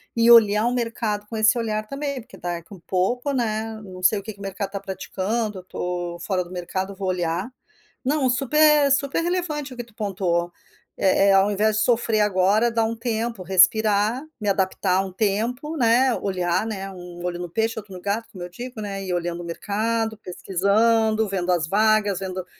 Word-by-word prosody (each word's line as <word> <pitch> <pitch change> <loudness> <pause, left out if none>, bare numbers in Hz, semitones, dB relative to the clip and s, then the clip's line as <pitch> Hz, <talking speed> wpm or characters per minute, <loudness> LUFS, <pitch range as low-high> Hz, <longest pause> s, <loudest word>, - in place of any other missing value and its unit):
E 230 0 +4
olhar 215 -2 +7
o 245 - 0
mercado 225 -3 -2
com 225 - -7
esse 220 +2 +4
olhar 215 -2 -2
também, 280 -1 -4
porque 245 - -15
daqui 175 0 -5
um 190 - -11
pouco, 195 - -1
né. 220 -2 -2
Não 185 -2 -10
sei 200 +2 +4
o - - -11
que 220 -1 -7
o - - -14
mercado 195 0 -4
tá 200 - -4
praticando, 195 +2 -3
eu - - -12
tô 175 -1 -4
fora 185 -2 -1
do 175 - -14
mercado, 185 +2 -4
vou 195 0 -4
olhar. 175 +3 -1 0.5
Não, 275 0 +1
super 295 +3 +4
super 280 +2 +1
relevante 325 -6 -2
o - - -13
que 240 - -4
tu 230 -2 -22
pontuou. 180 -5 -1 0.5
Eh 195 +1 +3
eh - - +6
ao 195 +2 +4
invés 215 +1 +1
de - - +2
sofrer 230 -2 +2
agora, 210 +3 +3
dar 230 -1 +1
um 230 - -2
tempo, 230 -2 -3
respirar, 210 +5 +3 0.2
me 210 - -4
adaptar 190 -1 +1
um 190 - -7
tempo, 230 - -1
né. 245 +1 +4
Olhar, 180 0 0
né. 195 -3 -4
Um 175 -1 -10
olho 175 -1 -3
no 175 0 -5
peixe, 225 +5 -1
outro 200 -2 -12
no 180 - -7
gato, 205 +4 -2
como 185 -5 -8
eu 175 - -7
digo, 240 +5 -8
né. 195 -2 -4
Ir 185 -1 -3
olhando 175 0 -2
o - - -8
mercado, 220 +6 -2
pesquisando, 215 +4 +1
vendo 185 -2 -1
as 170 -3 +1
vagas, 210 0 +2
vendo 185 -1 -5
210 Hz, 195 wpm, -23 LUFS, 185-230 Hz, 0.5 s, olhar